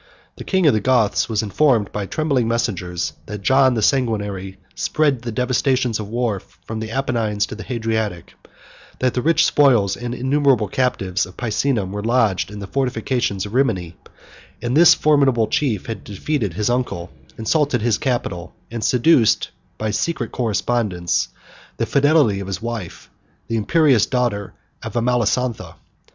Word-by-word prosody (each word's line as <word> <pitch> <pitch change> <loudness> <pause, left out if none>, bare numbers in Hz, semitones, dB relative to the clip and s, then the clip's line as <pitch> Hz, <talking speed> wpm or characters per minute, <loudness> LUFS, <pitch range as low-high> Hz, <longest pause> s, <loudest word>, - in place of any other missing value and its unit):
The - - -7
king 190 -3 +1
of 145 - +6
the 110 - +2
Goths 120 -5 +2
was 110 -1 0
informed 110 -1 +2
by 100 -1 -4
trembling 140 -5 0
messengers, 95 -7 -2
that 105 -1 -7
John 130 0 +4
the 110 - -1
Sanguinary 105 -7 -1 0.2
spread 145 -5 0
the 120 0 -5
devastations 125 -1 0
of 105 -1 -6
war 115 -3 -1
from 95 +5 -9
the 110 0 -5
Apennine 115 -4 -1
to - - -7
the 110 - -8
Hadriatic; 110 -7 -3 0.6
that 130 -1 0
the 125 - -1
rich 165 +2 +3
spoils 115 -9 +3
and 120 0 -5
innumerable 130 -4 +2
captives 95 -6 -1
of 90 - -15
Picenum 110 -3 -1
were 105 +1 -4
lodged 115 -6 +1
in 105 - -9
the 100 - -6
fortifications 120 -4 -1
of 105 - -8
Rimini; 100 -11 0 0.6
and 120 +2 -2
that 160 - +6
this 175 - +8
formidable 140 -6 +3
chief 110 -3 -1
had 115 - -6
defeated 105 - -3
his 105 +4 0
uncle, 120 -9 -2 0.3
insulted 130 +1 +1
his 115 -2 +1
capital, 105 -10 -3 0.2
and 115 -2 -4
seduced, 125 -1 +3 0.3
by 110 0 -2
secret 145 +9 -2
correspondence, 105 -5 0 0.5
the - - 0
fidelity 140 -8 +3
of 100 - -6
his 95 -2 -3
wife, 100 - -6 0.4
the 115 - -2
imperious 130 0 +3
daughter 120 -6 -1 0.3
of - - -7
Amalasontha. 120 0 0
115 Hz, 155 wpm, -20 LUFS, 105-130 Hz, 0.6 s, this